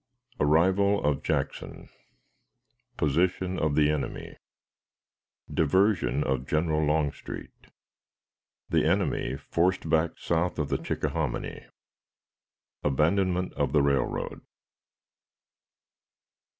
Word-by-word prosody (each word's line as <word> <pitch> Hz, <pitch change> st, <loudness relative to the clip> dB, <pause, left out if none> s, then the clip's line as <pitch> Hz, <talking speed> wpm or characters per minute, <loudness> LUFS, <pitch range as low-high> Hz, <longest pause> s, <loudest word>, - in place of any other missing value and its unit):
Arrival 95 Hz, +6 st, +3 dB
of 75 Hz, -1 st, +1 dB
Jackson. -, -, -3 dB, 1.1 s
Position 90 Hz, +5 st, +1 dB
of 75 Hz, -2 st, +1 dB
the 75 Hz, 0 st, +4 dB
Enemy. 75 Hz, -3 st, -4 dB, 1.2 s
Diversion 90 Hz, -2 st, +2 dB
of 65 Hz, 0 st, -2 dB
General 80 Hz, 0 st, +1 dB
Longstreet. 75 Hz, -1 st, -3 dB, 1.0 s
The -, -, +2 dB
Enemy 65 Hz, -, 0 dB
forced 85 Hz, +5 st, 0 dB
back 80 Hz, 0 st, +1 dB
south 85 Hz, +1 st, -1 dB
of 75 Hz, -3 st, -1 dB
the -, -, 0 dB
Chickahominy. -, -, -3 dB, 1.2 s
Abandonment 90 Hz, +6 st, +1 dB
of -, -, -1 dB
the 75 Hz, -2 st, +4 dB
Railroad. 70 Hz, -1 st, -1 dB
80 Hz, 85 wpm, -27 LUFS, 75-90 Hz, 1.2 s, the